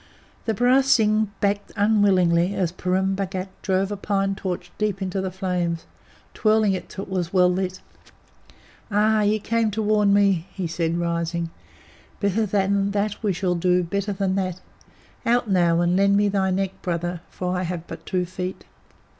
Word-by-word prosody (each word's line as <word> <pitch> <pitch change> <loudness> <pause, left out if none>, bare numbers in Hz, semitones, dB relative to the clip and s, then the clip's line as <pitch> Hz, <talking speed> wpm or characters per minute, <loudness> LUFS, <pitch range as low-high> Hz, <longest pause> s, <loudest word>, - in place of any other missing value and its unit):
The 225 - 0
barasingh 245 -3 +3
backed 205 0 0
unwillingly 195 -4 +3
as 175 -3 0
Purun 185 +2 0
Bhagat 190 -1 -3
drove 190 0 0
a - - -1
pine 195 -1 0
torch 185 -2 -5
deep 210 -2 0
into 190 0 -2
the 190 - -2
flame, 180 -2 -1 0.6
twirling 215 -2 +3
it 185 - -5
till 195 - -6
it - - -10
was 180 -2 -1
well 180 -1 +4
lit. 185 0 -3 1.1
"Ah! 215 +1 +3
ye 210 +1 +2
came 225 +1 0
to 215 +1 -2
warn 210 -1 +3
me," 200 -4 +3
he 190 - -4
said, 165 0 -1
rising. 170 0 -2 0.7
"Better 205 +2 +1
than 200 0 +1
that 205 0 -1
we 210 - +1
shall 180 0 0
do; 180 +1 +2
better 200 +4 -2
than 195 -1 -1
that. 185 -2 -2 0.6
Out, 240 0 +2
now, 175 -2 +3
and 175 +1 +2
lend 200 +1 +4
me 205 0 +3
thy 195 -1 +1
neck, 190 0 -2
Brother, 175 0 -2
for 180 0 -3
I 180 - -1
have 175 -2 -4
but - - -9
two 180 -1 -1
feet." 185 +1 -6
190 Hz, 170 wpm, -23 LUFS, 180-205 Hz, 1.1 s, well